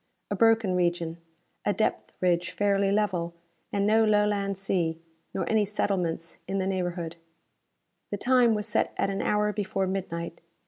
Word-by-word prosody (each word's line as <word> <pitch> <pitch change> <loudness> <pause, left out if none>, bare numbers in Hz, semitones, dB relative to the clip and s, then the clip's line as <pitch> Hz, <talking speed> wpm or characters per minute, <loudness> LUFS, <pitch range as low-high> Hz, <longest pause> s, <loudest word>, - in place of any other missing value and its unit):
A - - +1
broken 225 -4 +4
region, 170 -2 0 0.5
a 205 - +2
depth 220 - -1
ridge 175 -1 +2
fairly 200 -1 +2
level, 185 -5 0 0.4
and 200 0 +1
no 220 +2 +5
Lowland 205 -2 +2
sea, 175 -4 -1 0.3
nor - - -2
any 220 -1 +3
settlements 180 -5 -1
in 195 - -1
the 190 - 0
neighborhood. 175 -3 -2 0.9
The 205 - -2
time 245 0 +4
was 210 -1 -2
set 210 - 0
at 195 - +1
an 195 - -2
hour 210 0 +1
before 200 -2 -1
midnight. 170 -3 -4
195 Hz, 150 wpm, -27 LUFS, 175-210 Hz, 0.9 s, no